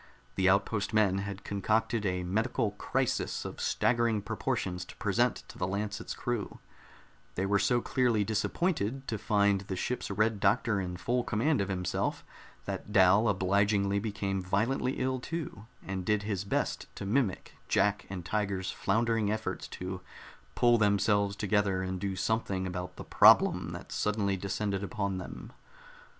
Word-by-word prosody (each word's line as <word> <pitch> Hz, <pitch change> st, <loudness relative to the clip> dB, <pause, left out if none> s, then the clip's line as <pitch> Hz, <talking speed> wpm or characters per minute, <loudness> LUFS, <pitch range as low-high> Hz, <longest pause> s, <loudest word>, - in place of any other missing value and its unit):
The 95 Hz, 0 st, +3 dB
outpost 100 Hz, +2 st, +1 dB
men 100 Hz, -3 st, +3 dB
had 100 Hz, 0 st, -5 dB
concocted 110 Hz, +2 st, 0 dB
a 90 Hz, -1 st, -1 dB
medical 110 Hz, +4 st, 0 dB
"crisis" -, -, -1 dB
of -, -, -6 dB
staggering 115 Hz, -3 st, +1 dB
proportions 90 Hz, 0 st, -2 dB
to -, -, -12 dB
present -, -, +1 dB
to -, -, -11 dB
the 90 Hz, -, 0 dB
Lancet's 100 Hz, +1 st, -3 dB
crew; 120 Hz, -4 st, -3 dB, 0.8 s
they 95 Hz, -, 0 dB
were 100 Hz, +1 st, +2 dB
so 120 Hz, +3 st, +2 dB
clearly 120 Hz, -5 st, +2 dB
disappointed 135 Hz, -, -1 dB
to 110 Hz, -, -2 dB
find 100 Hz, -2 st, +2 dB
the 95 Hz, -1 st, -5 dB
ship's 125 Hz, +7 st, -3 dB
Red 105 Hz, +1 st, +1 dB
Doctor 105 Hz, +1 st, +2 dB
in 90 Hz, -1 st, -4 dB
full 120 Hz, +6 st, 0 dB
command 120 Hz, +4 st, +1 dB
of 100 Hz, -, -2 dB
himself 90 Hz, -2 st, -2 dB, 0.4 s
that -, -, -5 dB
Dal 100 Hz, +3 st, +5 dB
obligingly 100 Hz, +1 st, +2 dB
became 100 Hz, -2 st, -2 dB
violently 110 Hz, +8 st, 0 dB
ill 130 Hz, 0 st, -1 dB
too, 135 Hz, -8 st, -6 dB, 0.2 s
and 95 Hz, -1 st, -3 dB
did 105 Hz, +2 st, +1 dB
his 100 Hz, -2 st, -2 dB
best -, -, -1 dB
to -, -, -6 dB
mimick 105 Hz, -2 st, 0 dB, 0.2 s
Jack 105 Hz, 0 st, +1 dB
and 90 Hz, -3 st, -6 dB
Tiger's 100 Hz, -2 st, -1 dB
floundering 110 Hz, 0 st, +1 dB
efforts 110 Hz, -4 st, -3 dB
to 90 Hz, 0 st, -6 dB, 0.5 s
pull 120 Hz, -1 st, +4 dB
themselves 100 Hz, -1 st, +2 dB
together 100 Hz, -2 st, +1 dB
and 95 Hz, 0 st, -3 dB
do 100 Hz, -1 st, -2 dB
something 95 Hz, -1 st, -1 dB
about 90 Hz, 0 st, -5 dB
the -, -, -8 dB
"problem" -, -, +5 dB
that -, -, -9 dB
suddenly 105 Hz, -2 st, 0 dB
descended 100 Hz, +1 st, -2 dB
upon 100 Hz, -2 st, -2 dB
them. -, -, -9 dB
100 Hz, 150 wpm, -30 LUFS, 95-110 Hz, 0.8 s, Dal